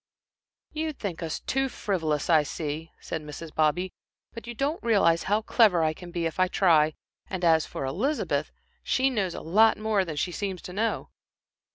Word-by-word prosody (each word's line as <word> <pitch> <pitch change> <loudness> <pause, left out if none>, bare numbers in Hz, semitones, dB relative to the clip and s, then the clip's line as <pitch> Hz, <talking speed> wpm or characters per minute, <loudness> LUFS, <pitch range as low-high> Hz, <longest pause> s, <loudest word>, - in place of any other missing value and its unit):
"You 310 0 -2
think 195 - -5
us 160 -2 -3
too 270 0 0
frivolous, 160 - -1
I 160 -3 +5
see," 155 +2 -5
said 160 - -5
Mrs. 150 +1 -9
Bobby. 160 +4 +1 0.4
"But 230 -1 -9
you 240 - -6
don't 285 +7 -1
realize 195 -8 +3
how 210 +2 +2
clever 205 -8 +4
I 155 0 +2
can 175 +2 -11
be 170 -1 -2
if 165 +2 -3
I 185 - +4
try, 160 -5 +3 0.3
and 185 -2 -2
as 160 -2 +4
for - - -5
Elizabeth, 240 - -1 0.3
she 265 +1 +1
knows 195 -7 -1
a - - -6
lot 215 +7 +4
more 215 -2 +1
than 165 -4 -5
she 175 +4 -1
seems 190 -1 -4
to 180 - -8
know." 220 +4 -1
180 Hz, 185 wpm, -27 LUFS, 160-220 Hz, 0.4 s, I